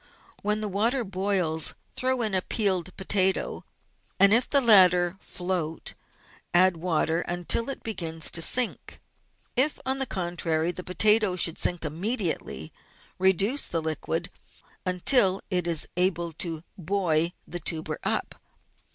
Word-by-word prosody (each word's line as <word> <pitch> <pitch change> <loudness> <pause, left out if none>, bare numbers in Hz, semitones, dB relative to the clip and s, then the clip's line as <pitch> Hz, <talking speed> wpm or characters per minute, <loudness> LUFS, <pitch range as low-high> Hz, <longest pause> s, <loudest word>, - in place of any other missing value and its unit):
When 210 +1 -1
the 215 - -2
water 230 +6 0
boils, 185 -5 -1 0.2
throw 255 -1 -1
in 215 -3 -1
a 185 - +1
peeled 185 -3 -2
potato, 190 -1 +1 0.5
and, 200 +1 +6
if 240 +2 +2
the 280 - +4
latter 180 -7 +5
float, 175 -5 -4 0.6
add 185 0 +4
water 165 -1 -1
until 175 +8 +1
it 275 - -6
begins 165 -7 -2
to 165 - -1
sink. 245 +8 +2 0.6
If, 270 +4 +2
on 265 +1 0
the 270 - -1
contrary, 175 -3 -2
the 180 +1 -8
potato 210 +1 +3
should 170 -2 +3
sink 175 -2 -1
immediately, 185 - -2 0.5
reduce 195 - +1
the 165 - -1
liquid 160 +2 -3 0.6
until 190 +1 +4
it 180 -2 0
is 165 -3 +3
able 175 -2 0
to 165 -1 -3 0.2
buoy 175 -2 0
the 175 - -4
tuber 160 -3 -3
up. - - -2
185 Hz, 135 wpm, -26 LUFS, 170-210 Hz, 0.6 s, and